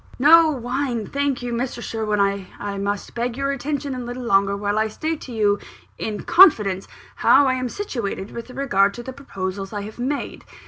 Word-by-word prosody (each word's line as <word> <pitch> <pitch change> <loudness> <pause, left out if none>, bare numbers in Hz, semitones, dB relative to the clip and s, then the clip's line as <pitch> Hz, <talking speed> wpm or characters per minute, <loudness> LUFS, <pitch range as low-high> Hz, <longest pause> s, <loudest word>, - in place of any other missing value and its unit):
"No 320 +4 +7
wine, 250 -3 -2
thank 280 -3 -1
you, 240 -1 -3
Mr. 240 +1 -2
Sherwin. 220 -3 -2 0.4
I 205 -1 -4
must 200 0 -3
beg 240 +1 -2
your 275 0 0
attention 280 0 -3
a 255 - -4
little 245 +1 -6
longer, 200 -3 +2
while 205 +1 0
I 220 - +2
state 315 +8 -3
to 255 - -9
you, 205 -3 +2 0.4
in 215 -1 -3
confidence, 210 - +5 0.3
how 285 - +5
I 260 - +2
am 255 -1 -2
situated 235 - -4
with 235 +1 -7
regard 200 -7 +1
to 240 - -7
the 260 - -7
proposals 195 -7 -5
I 205 - -3
have 215 +3 -9
made. 280 +4 -3
240 Hz, 185 wpm, -22 LUFS, 205-275 Hz, 0.4 s, No